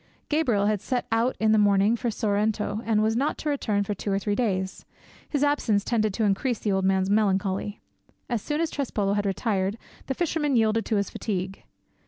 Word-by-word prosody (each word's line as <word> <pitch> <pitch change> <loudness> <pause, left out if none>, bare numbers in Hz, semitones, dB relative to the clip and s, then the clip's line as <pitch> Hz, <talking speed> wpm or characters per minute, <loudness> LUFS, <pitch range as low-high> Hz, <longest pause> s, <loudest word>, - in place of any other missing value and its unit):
Gabriel 250 -10 +2
had 210 -2 +1
set 250 +2 -2
out 230 +3 +1
in 220 0 +3
the 215 - +5
morning 205 +2 +4
for 235 +1 -2
Sorrento 210 0 0
and 215 -2 +2
was 220 +1 +1
not 275 +5 0
to 305 - -3
return 215 -8 0
for 205 - -2
two 200 +1 -4
or 195 - +2
three 205 +1 -1
days; 190 -4 -1 0.5
his 290 -2 0
absence 245 -8 +2
tended 215 -3 +1
to 225 - 0
increase 215 +4 +1
the 205 - -1
old 190 -1 +1
man's 190 0 +2
melancholy. 200 -1 0 0.5
As 235 -4 -1
soon 295 +6 -2
as 330 - -1
Trespolo 210 -8 -1
had 205 0 0
retired, 195 0 -1 0.3
the 270 - -2
fisherman 300 -4 0
yielded 225 -1 +2
to 220 - +1
his 200 -1 0
fatigue. 190 -2 -4
215 Hz, 200 wpm, -26 LUFS, 200-240 Hz, 0.5 s, the